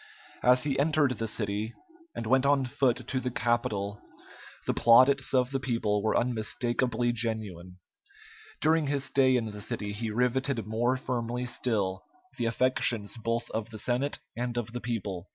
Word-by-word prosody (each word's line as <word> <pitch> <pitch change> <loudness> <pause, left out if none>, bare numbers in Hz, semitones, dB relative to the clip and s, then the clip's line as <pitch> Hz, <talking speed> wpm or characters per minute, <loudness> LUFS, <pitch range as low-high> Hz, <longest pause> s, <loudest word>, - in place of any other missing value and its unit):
As 125 +1 +4
he 140 -2 -1
entered 150 -2 +3
the 115 -2 -2
city 105 +1 -2 0.4
and - - -4
went 130 +3 +3
on 140 -1 +3
foot 125 -1 0
to 130 - -1
the 130 - -2
Capitol, 105 -4 -1 0.6
the - - +1
plaudits 130 +3 +5
of 125 -1 +2
the 135 - 0
people 115 -5 0
were 110 +1 +1
unmistakably 120 +1 0
genuine. 105 -6 -4 0.8
During 155 -1 +3
his 140 -1 0
stay 130 -2 +3
in 115 - -1
the 105 -1 -6
city 105 0 -3
he 110 +2 -3
riveted 125 +2 0
more 120 +4 0
firmly 125 -1 -3
still 105 -6 -1 0.4
the - - 0
affections 115 -3 +2
both 115 +1 -2
of 110 0 -3
the 110 - -8
Senate 125 +6 0 0.2
and 120 0 -3
of 120 -1 -3
the 125 - -4
people. 100 -6 -4
120 Hz, 160 wpm, -29 LUFS, 110-130 Hz, 0.8 s, plaudits